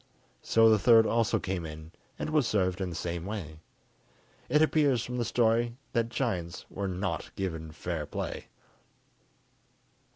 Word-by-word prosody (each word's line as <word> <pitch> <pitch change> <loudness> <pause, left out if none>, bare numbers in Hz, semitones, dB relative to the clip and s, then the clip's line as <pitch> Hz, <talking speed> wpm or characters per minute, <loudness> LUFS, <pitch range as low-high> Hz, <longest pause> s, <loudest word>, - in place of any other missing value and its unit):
So 115 0 +4
the 110 -1 +5
third 115 +1 +6
also 115 0 +2
came 95 -2 -3
in, 80 0 -8 0.3
and - - -3
was 150 -5 +3
served 95 -2 0
in 95 - -1
the 85 - -6
same 85 0 -3
way. 90 -6 -6 0.9
It 150 +4 +5
appears 145 -6 +3
from 125 0 -4
the 120 - +1
story 120 +1 +1 0.2
that 115 -2 +1
giants 95 -10 -3
were 100 0 -3
not 95 -1 -3
given 80 -5 -4
fair 80 -2 -4
play! - - -5
100 Hz, 150 wpm, -29 LUFS, 85-115 Hz, 0.9 s, third